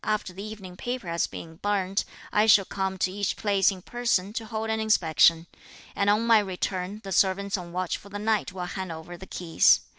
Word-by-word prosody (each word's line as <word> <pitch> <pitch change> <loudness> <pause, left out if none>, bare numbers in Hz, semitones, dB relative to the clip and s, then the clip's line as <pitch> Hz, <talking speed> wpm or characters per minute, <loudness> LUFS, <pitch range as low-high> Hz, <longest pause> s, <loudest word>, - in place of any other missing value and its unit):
after 210 -4 -1
the 190 - -8
evening 205 -4 -8
paper 245 0 -4
has 170 0 0
been 165 -1 -9
burnt, 195 -1 0 0.3
I 210 +1 +4
shall 205 -3 +6
come 190 0 -3
to 185 - 0
each 200 0 -1
place 200 -3 +3
in 185 -3 -6
person 220 -5 0
to 225 -1 -4
hold 220 0 -3
an 220 - 0
inspection; 165 -6 +4 0.5
and 200 0 +2
on 210 +3 +3
my 230 -2 +6
return, 190 +1 -3
the 195 - -7
servants 195 +1 +2
on 175 -3 -6
watch 180 0 -2
for 200 - -14
the 205 - -5
night 215 -1 0
will 185 -1 -5
hand 185 0 -5
over 160 +2 -8
the 190 +2 -11
keys. 170 -2 +3
195 Hz, 210 wpm, -26 LUFS, 180-210 Hz, 0.5 s, shall